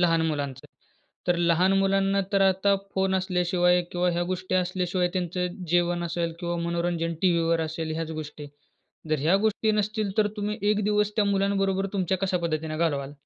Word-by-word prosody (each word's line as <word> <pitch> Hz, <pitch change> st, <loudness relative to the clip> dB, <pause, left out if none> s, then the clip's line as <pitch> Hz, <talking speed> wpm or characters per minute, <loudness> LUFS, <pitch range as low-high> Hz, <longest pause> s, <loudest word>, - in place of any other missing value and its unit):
लहान 165 Hz, -2 st, +3 dB
मुलांचं, 140 Hz, -4 st, -3 dB, 0.6 s
तर 175 Hz, -, +3 dB
लहान 170 Hz, +2 st, +3 dB
मुलांना 195 Hz, 0 st, +2 dB
तर 195 Hz, -, +4 dB
आता 195 Hz, +1 st, +3 dB, 0.2 s
फोन 190 Hz, 0 st, +1 dB
असल्याशिवाय 180 Hz, -1 st, +2 dB
किंवा 180 Hz, 0 st, +1 dB
ह्या 175 Hz, 0 st, 0 dB
गोष्टी 185 Hz, 0 st, -2 dB
असल्याशिवाय, 180 Hz, 0 st, 0 dB
त्यांचं 180 Hz, 0 st, -1 dB, 0.2 s
जेवण 175 Hz, 0 st, +2 dB
असेल 170 Hz, 0 st, -2 dB
किंवा 175 Hz, -1 st, -2 dB
मनोरंजन 170 Hz, -1 st, -1 dB
टीव्हीवर 170 Hz, -2 st, +2 dB
असेल, 160 Hz, 0 st, -3 dB
ह्याच 165 Hz, 0 st, -3 dB
गोष्टी. 150 Hz, -1 st, -9 dB, 0.6 s
जर 155 Hz, -2 st, +1 dB
ह्या 165 Hz, +6 st, +3 dB
गोष्टी 220 Hz, 0 st, +1 dB
नसतील, 210 Hz, 0 st, -1 dB
तर 210 Hz, -1 st, +4 dB
तुम्ही 210 Hz, +1 st, -2 dB
एक 210 Hz, -1 st, 0 dB
दिवस 210 Hz, 0 st, +1 dB
त्या 210 Hz, -, +2 dB
मुलांबरोबर 195 Hz, -1 st, +1 dB
तुमच्या 190 Hz, -1 st, 0 dB
कशा 185 Hz, -1 st, 0 dB
पद्धतीने 155 Hz, -2 st, -2 dB
घालवाल? 145 Hz, -4 st, -1 dB
180 Hz, 165 wpm, -26 LUFS, 170-195 Hz, 0.6 s, तर